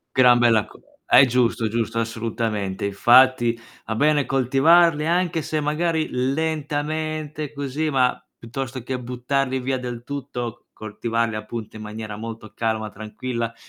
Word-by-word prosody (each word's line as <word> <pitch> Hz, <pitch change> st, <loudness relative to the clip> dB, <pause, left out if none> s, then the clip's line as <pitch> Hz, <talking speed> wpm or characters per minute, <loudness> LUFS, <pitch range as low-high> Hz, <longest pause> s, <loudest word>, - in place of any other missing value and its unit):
Gran 125 Hz, -2 st, +6 dB
bella 115 Hz, -3 st, +4 dB
cosa. -, -, -18 dB, 0.2 s
È 130 Hz, -, +7 dB
giusto, 120 Hz, -2 st, +1 dB
giusto, 115 Hz, 0 st, -2 dB
assolutamente. 110 Hz, -3 st, -3 dB
Infatti, 120 Hz, +3 st, +4 dB, 0.3 s
a 110 Hz, -, -2 dB
bene 145 Hz, +3 st, +2 dB
coltivarli, 150 Hz, +5 st, +4 dB
anche 170 Hz, -2 st, +1 dB
se 155 Hz, +1 st, -2 dB
magari 160 Hz, +2 st, 0 dB
lentamente, 155 Hz, +2 st, -2 dB
così, 145 Hz, +2 st, -2 dB
ma 130 Hz, -2 st, +2 dB, 0.2 s
piuttosto 130 Hz, +1 st, -5 dB
che 130 Hz, +1 st, -3 dB
buttarli 130 Hz, +2 st, -1 dB
via 130 Hz, +1 st, -1 dB
del 120 Hz, -2 st, -6 dB
tutto, 120 Hz, -4 st, -6 dB
coltivarli, 115 Hz, +1 st, -2 dB
appunto, 110 Hz, 0 st, -6 dB
in 110 Hz, -, -8 dB
maniera 110 Hz, 0 st, -6 dB
molto 110 Hz, 0 st, -8 dB
calma, 110 Hz, -2 st, -2 dB
tranquilla, 115 Hz, +3 st, -5 dB
125 Hz, 130 wpm, -23 LUFS, 115-145 Hz, 0.3 s, È